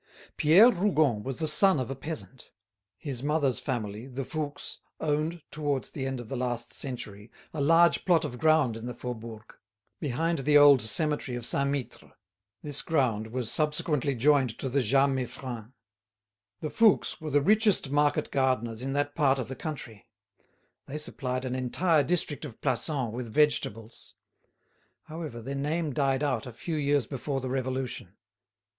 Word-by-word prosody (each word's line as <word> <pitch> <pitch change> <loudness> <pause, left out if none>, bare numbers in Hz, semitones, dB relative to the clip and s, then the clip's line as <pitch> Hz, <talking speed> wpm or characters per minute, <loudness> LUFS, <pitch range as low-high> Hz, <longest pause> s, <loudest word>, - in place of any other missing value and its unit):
Pierre 185 +11 +6
Rougon 155 - +1
was 130 +2 -5
the 160 - -1
son 190 +2 +4
of 130 0 -3
a - - -3
peasant. 135 -2 -8 0.5
His 135 -2 -4
mother's 145 -3 +1
family, 110 -3 -4
the 135 0 -5
Fouques, 145 0 -5 0.2
owned, 155 +2 -1
towards 145 -2 -2
the 135 -2 -4
end 135 -1 -3
of 120 - -8
the 135 - -5
last 120 -2 -3
century, 105 -5 -6 0.2
a 155 - -3
large 165 +4 +4
plot 170 -4 +3
of 125 -4 -6
ground 155 -7 +3
in 115 +1 -7
the 125 - -6
Faubourg, 115 -3 -8 0.5
behind 165 +3 -1
the 145 +2 +4
old 145 -3 +7
cemetery 145 - 0
of 120 - -5
Saint 140 +2 +1
Mittre; 140 -3 -5 0.5
this 145 -1 +4
ground 120 -9 0
was 120 0 -4
subsequently 150 -2 0
joined 130 -2 +2
to 135 - -4
the 140 +2 +1
Jas 135 +4 +3
Meiffren. 125 -3 -4 0.9
The 155 - -4
Fouques 220 -6 +3
were 155 - -4
the 145 0 +3
richest 205 - +3
market 145 0 +1
gardeners 125 -4 0
in 135 +1 -3
that 145 0 -1
part 140 -4 +2
of 130 -2 -4
the 135 - -5
country; 135 - -7 0.8
they 145 - -5
supplied 130 -3 -3
an 125 - -3
entire 145 +6 +1
district 165 -3 -1
of 135 -7 -8
Plassans 135 -8 0
with 120 -2 -5
vegetables. 115 -6 -1 0.9
However, 155 -8 -7
their 135 +4 -5
name 150 +2 -2
died 135 0 +1
out 130 -5 -1
a 125 - -8
few 165 +7 -5
years 145 -3 +1
before 135 +2 -3
the 130 -1 -5
Revolution. 130 0 -4
135 Hz, 165 wpm, -28 LUFS, 125-150 Hz, 0.9 s, old